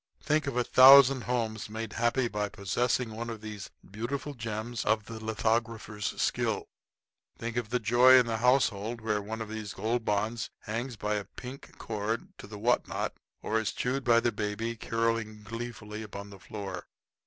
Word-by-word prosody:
Think 155 -1 +1
of 130 -3 -2
a 125 - +3
thousand 130 -1 +8
homes 110 -3 -2
made 110 0 -5
happy 120 +2 +1
by 105 -2 -2
possessing 120 +5 0
one 115 +1 -4
of 115 -2 -6
these 105 -2 -7 0.2
beautiful 125 +8 -4
gems 115 -1 -4
of 110 -1 +1
the 110 -1 -8
lithographer's 110 -1 -1
skill! - - 0 0.7
Think 115 0 -4
of 120 -3 -2
the 125 +1 +1
joy 120 +3 +6
in 125 -1 +6
the 115 -1 -1
household 120 -2 +2
where 105 -1 0
one 110 +2 -5
of 110 - -5
these 110 -2 -6
Gold 115 +4 -1
Bonds 105 +2 -1
hangs 115 +3 -4
by 105 0 -1
a 100 - -4
pink 130 +2 -10
cord 110 +1 -3
to - - -9
the 105 0 -8
what 120 +4 +2
not, - - -2 0.3
or 110 +1 +1
is 110 - -1
chewed 130 +2 -1
by 115 -2 +5
the 120 0 +1
baby, 105 +2 -3
caroling 115 -1 -1
gleefully 110 -1 -6
upon 100 -1 -8
the 100 - -12
floor! 95 -3 -7
115 Hz, 175 wpm, -29 LUFS, 105-120 Hz, 0.7 s, thousand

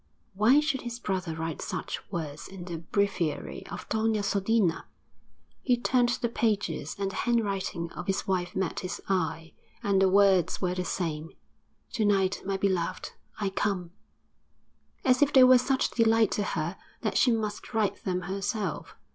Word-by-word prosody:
Why 220 +9 +5
should 300 -3 0
his 240 -1 -5
brother 185 -7 -3
write 160 -1 -4
such - - -4
words 155 -5 -5
in 190 -2 -9
the 170 -3 -5
breviary 175 -2 -2
of - - -7
Doña 220 -1 +1
Sodina? 200 -3 +1 0.8
He 250 -2 +2
turned 245 0 +2
the 240 0 0
pages 205 -10 -1
and 195 -1 -2
the - - -9
handwriting 195 -7 -1
of 180 - -7
his 195 - 0
wife 180 -2 -1
met 190 -3 -1
his 180 - -5
eye 165 -3 -1 0.3
and 195 -1 +2
the 190 - +5
words 195 -2 +4
were 180 -2 0
the 180 0 -3
same 165 -3 -3 0.6
'To 225 - 0
night, 195 -2 +2
my 195 0 -1
beloved, 190 -3 -1 0.3
I 200 -2 0
come' 185 -4 -1 1.1
as 255 +1 +4
if 290 0 +4
they 260 - +8
were 255 0 +8
such 265 +1 +1
delight 225 -2 +3
to 205 - 0
her 170 +4 -2 0.2
that 215 - -1
she 250 - +4
must 215 -2 -2
write 215 -3 0
them 180 -1 -1
herself. 195 0 -3
195 Hz, 165 wpm, -28 LUFS, 180-225 Hz, 1.1 s, they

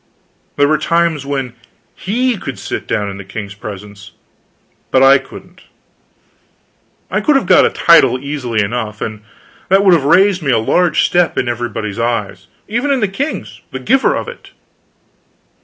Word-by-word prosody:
There 145 - +3
were 155 +1 +1
times 170 -4 0
when 135 -4 -3 0.4
he 245 +6 -1
could 140 -9 -7
sit - - -5
down 105 -1 -1
in 100 - -8
the 100 - -8
king's 100 +1 -7
presence, 100 0 -10 0.8
but 130 0 +3
I 135 0 +7
couldn't. 180 +7 -14 1.5
I - - 0
could 300 - +2
have 270 - +2
got - - +5
a - - 0
title 135 -7 +4
easily 130 -5 -2
enough, 105 0 -4
and 105 -1 -5 0.5
that 195 +2 +4
would 190 - +6
have 165 -5 +3
raised 185 +4 +4
me 145 - -2
a 120 - +3
large 165 +9 +2
step 175 -1 +1
in 125 - 0
everybody's 115 -3 -4
eyes; 110 -5 -2 0.2
even 240 +7 -1
in 275 -2 +2
the 210 - +1
king's, 265 +11 -5
the - - -6
giver 265 0 +2
of - - -4
it. 475 - -11
140 Hz, 165 wpm, -15 LUFS, 110-185 Hz, 1.5 s, I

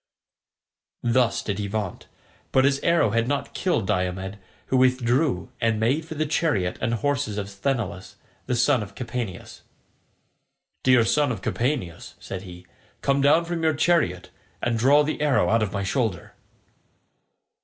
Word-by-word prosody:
Thus 120 0 +2
did 100 -1 -3
he 100 - -2
vaunt; 100 -2 -4 0.4
but 130 0 +4
his 140 0 +2
arrow 170 -11 +2
had 115 +2 +1
not 145 +1 -2
killed 175 - 0
Diomed, 95 +1 -2 0.3
who 130 - +2
withdrew 130 +2 +2
and 115 -1 +1
made 135 +8 +1
for 160 - -7
the 155 +1 0
chariot 145 - 0
and 115 +1 0
horses 140 -4 -1
of 100 -1 -3
Sthenelus, 100 -4 -3 0.3
the 125 - 0
son 125 +1 +3
of 100 - -8
Capaneus. 120 -6 -6 1.2
"Dear 125 -3 +4
son 145 +3 +2
of 100 -6 -5
Capaneus," 115 - -2
said 95 - -6
he, 90 -2 -11 0.4
"come 140 0 +2
down 150 +4 +4
from 170 -1 -3
your 160 -2 +2
chariot, 145 - +1 0.3
and 120 -1 -1
draw 140 +5 +5
the 150 +1 -3
arrow 145 -3 +2
out 115 0 +3
of 105 -3 -1
my 100 0 -2
shoulder." 105 -2 -2
120 Hz, 155 wpm, -24 LUFS, 100-145 Hz, 1.2 s, draw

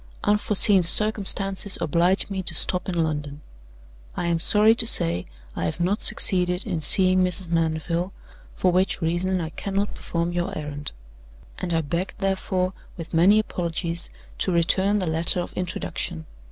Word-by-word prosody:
Unforeseen 205 -1 +4
circumstances 195 +1 +2
oblige 170 +3 0
me 195 -2 -5
to 175 - -3
stop 180 0 +3
in 170 -2 -1
London. 150 -2 -5 0.8
I - - -3
am 170 -1 -1
sorry 210 +5 +3
to 230 0 +4
say 85 - +3 0.3
I - - -3
have 80 - -4
not 185 +5 -1
succeeded 180 -1 +3
in 175 -6 -4
seeing 185 +4 +2
Mrs. 180 -1 +2
Mandeville, 165 +2 -2 0.4
for 185 - 0
which 185 +2 0
reason 175 +3 -2
I 160 -2 -5
cannot 200 +4 -4
perform 170 0 -4
your 175 +3 -4
errand; 145 -1 -7 0.7
and 180 - -5
I 165 -1 0
beg, 170 +5 -4
therefore, 190 -1 -2 0.2
with 165 0 -10
many 180 +6 +4
apologies, 170 -4 -3 0.3
to 190 - -1
return 190 +4 +1
the 190 - -2
letter 165 +2 +4
of 175 - -6
introduction. 170 - -5
180 Hz, 155 wpm, -23 LUFS, 165-195 Hz, 0.8 s, Unforeseen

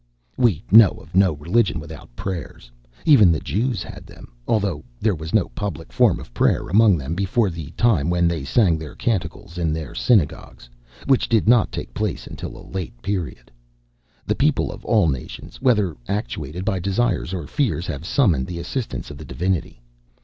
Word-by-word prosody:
We 115 - +2
know 110 -1 +7
of - - -16
no 95 -2 +4
religion 85 +5 +1
without 75 -5 -11
prayers; 85 -9 -6 0.3
even 110 - +7
the 80 - +1
Jews 105 - -1
had - - -10
them, - - -14 0.2
although 100 -9 0 0.2
there 110 -1 +2
was 80 -1 -6
no 110 -5 +2
public 100 -7 -6
form - - +3
of - - -12
prayer - - +1
among 105 0 +5
them 70 +2 -4
before 100 +3 +1
the 80 -4 -7
time 95 -11 +2
when 85 -1 +2
they 85 -4 -1
sang 85 - +2
their 80 -2 -8
canticles 95 -3 -3
in 80 -3 0
their 80 -5 -5
synagogues, 80 - 0 0.4
which 135 - +2
did 110 -2 +2
not 120 -1 +4
take - - -6
place - - -3
until - - -8
a - - -12
late 90 -10 -6
period. 85 -12 -4 0.7
The - - +1
people - - +1
of - - -11
all - - +3
nations, 65 -5 -5
whether 105 - +2
actuated 95 -3 -4
by 100 -4 0
desires 100 0 0
or 90 -5 -4
fears, 105 - -1
have 70 - -5
summoned 85 - +2
the 85 - -5
assistance 85 - -4
of 70 - -10
the - - -9
Divinity. 85 -9 -2
90 Hz, 180 wpm, -22 LUFS, 80-105 Hz, 0.7 s, know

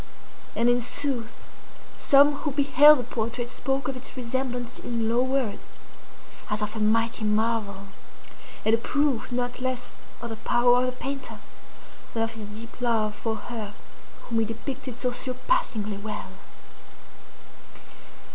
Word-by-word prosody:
And 235 - +2
in 245 0 +4
sooth 250 -2 -1 0.5
some 285 0 +6
who 300 - -2
beheld 285 +1 +7
the 250 - -2
portrait 235 +1 -2
spoke 270 +2 -2
of 270 - -2
its 255 +1 -9
resemblance 250 0 -3
in 230 -2 -2
low 235 +2 +3
words, 260 -5 -1 0.8
as 210 0 0
of 210 +1 -3
a - - -3
mighty 225 +1 +2
marvel, 210 -2 0 0.8
and 220 - +4
a 230 - +5
proof 285 -1 +1
not 245 0 -2
less 255 -1 -3 0.2
of 235 -1 -6
the 225 - -5
power 245 +2 +4
of 250 - +2
the - - 0
painter 270 +2 -5 0.8
than 225 - +2
of 225 - -1
his 225 -2 -7
deep 225 +4 -8
love 225 -3 +1
for 220 +1 -2
her 220 -3 -6 0.5
whom 230 -2 -1
he 225 - +2
depicted 255 +3 -6
so 250 - 0
surpassingly 250 - -1
well. 210 +1 -5
240 Hz, 145 wpm, -26 LUFS, 225-260 Hz, 0.8 s, beheld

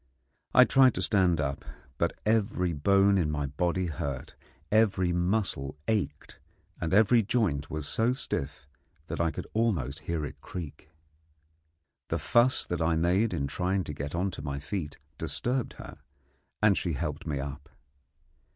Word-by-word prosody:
I - - +10
tried 130 -2 +5
to 90 - -1
stand 90 -3 +3
up, 70 -2 -2 0.4
but - - +1
every 105 -5 +1
bone 100 +5 +4
in 80 -4 +1
my 75 -1 -1
body 85 +6 -1
hurt, 70 -5 -4 0.4
every 100 -5 +3
muscle 90 -6 -1
ached, 110 -3 -2 0.4
and 80 - -2
every 110 +4 +5
joint 100 - 0
was 75 -2 -4
so 115 +2 +1
stiff 75 - -4 0.4
that 85 +1 -3
I 85 - +2
could - - -6
almost 90 - 0
hear 80 -3 -1
it - - -9
creak. 80 -3 -8 1.2
The - - -1
fuss 120 +2 +3
that 90 -2 -3
I 80 0 +2
made 90 +7 +2
in 70 - -1
trying 95 +6 -1
to 75 - -6
get 70 +2 -5
on 95 +3 0
to 80 - -7
my 70 -1 -3
feet 75 +1 -4 0.2
disturbed 125 0 -2
her, - - -11 0.6
and 105 -2 +6
she 85 -3 -1
helped 75 0 -4
me 75 -2 -1
up. 70 +2 -6
85 Hz, 155 wpm, -29 LUFS, 75-100 Hz, 1.2 s, I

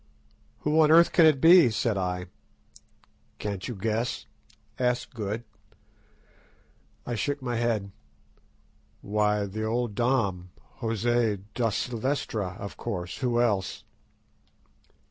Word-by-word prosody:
"Who 150 +2 +2
on 155 - +5
earth 170 +2 +6
can 165 -2 +6
it 150 -4 +4
be?" 165 -2 +7
said 110 0 0
I. 90 -1 -2 1.1
"Can't 100 -3 -4
you 120 - -5
guess?" 110 +4 -2 0.5
asked 125 0 0
Good. 110 0 -4 1.6
I 120 - -3
shook 145 +5 -1
my 120 -2 -2
head. 110 -4 -1 1.1
"Why, 105 0 +1
the 105 +2 -5
old 115 0 -1
Dom, 100 -7 0 0.3
José 115 -3 0
da 115 -1 +1
Silvestra, 110 -4 -2
of 100 - -7
course—who 110 +7 -2
else?" 100 -5 0
115 Hz, 105 wpm, -27 LUFS, 100-125 Hz, 1.6 s, be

